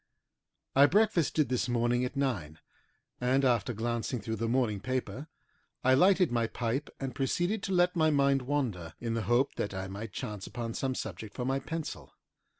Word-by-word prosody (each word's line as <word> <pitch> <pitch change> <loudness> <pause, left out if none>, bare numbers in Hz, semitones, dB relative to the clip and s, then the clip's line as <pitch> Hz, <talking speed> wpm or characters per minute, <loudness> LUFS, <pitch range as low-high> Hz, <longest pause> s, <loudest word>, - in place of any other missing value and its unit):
I 140 +1 +8
breakfasted 170 -6 +2
this 125 0 0
morning 120 +1 +1
at 125 - -5
nine, 105 - -1 0.6
and 130 +2 +2
after 120 -2 +2
glancing 120 +2 -2
through 110 +1 -4
the 115 - -1
morning 120 -5 +1
paper 130 +5 -3 0.6
I 130 - +5
lighted 180 +3 +5
my 115 -1 +1
pipe 120 +5 -2
and 135 -2 -4
proceeded 175 - 0
to 195 - -4
let 180 -1 +3
my 155 -2 +4
mind 140 -2 +3
wander 120 - -2
in 115 -1 -2
the 115 - -1
hope 125 +3 +3
that 100 -1 -2
I 95 0 -3
might 100 +3 -6
chance 105 +1 -5
upon 115 -2 -4
some 130 +1 -2
subject 105 -1 -6
for 125 - -3
my 135 +1 +1
pencil. 150 - -6
125 Hz, 175 wpm, -30 LUFS, 115-140 Hz, 0.6 s, I